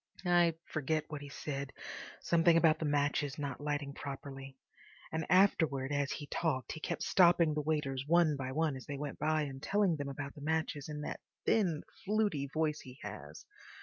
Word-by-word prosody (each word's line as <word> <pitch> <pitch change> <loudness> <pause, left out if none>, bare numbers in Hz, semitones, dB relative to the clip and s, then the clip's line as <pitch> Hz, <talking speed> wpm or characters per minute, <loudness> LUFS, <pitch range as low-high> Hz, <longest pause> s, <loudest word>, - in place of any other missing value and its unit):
I 175 -2 +4
forget 155 0 -1
what 150 -2 -5
he 145 - -8
said—something 150 +4 0
about 160 -2 +4
the 160 - -1
matches 145 -1 +1
not 140 -2 -4
lighting 145 -1 -2
properly, 135 -1 -7 0.5
and 160 0 -2
afterwards 160 -7 +3
as 145 0 0
he 145 - -4
talked 145 -4 -1
he 160 - -6
kept - - -3
stopping 170 -3 +5
the 150 - 0
waiters 140 -3 -1
one 170 -2 +4
by 130 -1 -4
one 155 0 +1
as 130 - -9
they 145 -1 -4
went 145 0 -5
by, 155 0 +2
and 135 -2 -6
telling 195 -2 +2
them 140 -1 -3
about 140 0 -5
the 145 - -12
matches 155 -1 -1
in 150 0 -4
that - - -4 0.3
thin, 180 -9 +2 0.2
fluty 205 -9 +1
voice 155 -1 0
he 130 0 -12
has. - - -8
150 Hz, 180 wpm, -33 LUFS, 140-160 Hz, 0.5 s, stopping